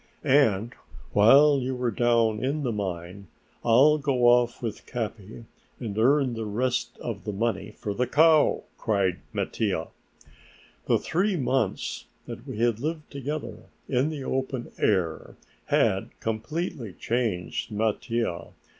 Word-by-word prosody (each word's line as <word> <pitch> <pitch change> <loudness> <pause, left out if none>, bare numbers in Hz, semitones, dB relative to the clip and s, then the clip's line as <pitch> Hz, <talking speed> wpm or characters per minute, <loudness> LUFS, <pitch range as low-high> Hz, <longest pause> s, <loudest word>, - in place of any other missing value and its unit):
"And 120 -6 +3 0.4
while 140 +7 +6
you 130 0 -3
are 120 - +1
down 115 -1 +2
in 145 +3 -1
the 125 - 0
mine 95 -2 -5 0.4
I'll 135 +7 +5
go 135 -4 +1
off 120 0 +4
with 110 -3 -5
Capi 110 -2 -6 0.3
and 110 -5 -5
earn 130 +3 +3
the 110 -1 -4
rest 125 +4 -1
of 110 -4 -5
the 105 - -3
money 105 0 -2
for 105 - -3
the 125 +4 0
cow," 155 +3 +4 0.2
cried 100 -5 0
Mattia. - - -2 1.0
The - - +4
three 190 +4 0
months 130 - -1 0.2
that - - -9
we - - -6
had 115 -1 +1
lived 155 +3 -4
together 145 +2 -5 0.3
in 130 +3 +1
the 150 -4 -5
open 130 -2 -3
air 90 -6 0 0.3
had - - +2
completely 115 - -3
changed 110 -7 -2
Mattia. 110 -2 -2
120 Hz, 130 wpm, -26 LUFS, 105-135 Hz, 1.0 s, while